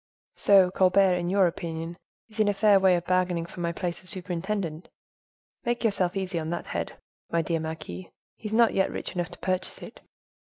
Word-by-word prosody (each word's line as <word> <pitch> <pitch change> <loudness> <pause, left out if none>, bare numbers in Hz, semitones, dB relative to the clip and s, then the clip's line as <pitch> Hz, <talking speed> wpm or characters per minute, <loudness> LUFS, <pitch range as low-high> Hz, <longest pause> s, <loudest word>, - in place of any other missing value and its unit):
"So, 195 -3 +5
Colbert, 190 0 +4
in 175 -1 -1
your 195 0 +4
opinion, 165 -1 -3 0.3
is 220 -1 -11
in 215 - +4
a 205 - +2
fair 205 -1 +5
way 190 -1 +5
of 175 0 -2
bargaining 180 -2 +1
for 175 - -11
my 170 -1 0
place 175 0 -4
of 185 - -13
superintendent. 180 -2 -3 0.7
Make 240 0 -1
yourself 195 -4 +1
easy 185 -3 -2
on 160 0 -4
that 175 0 -3
head, - - -4 0.4
my 165 0 +1
dear 165 0 -1
marquise; 155 - -6 0.3
he 215 - -7
is 210 - -5
not 230 0 +5
yet 190 - +2
rich - - -5
enough 175 -2 -2
to 175 - -10
purchase 185 0 -3
it." - - -11
180 Hz, 200 wpm, -27 LUFS, 170-195 Hz, 0.7 s, So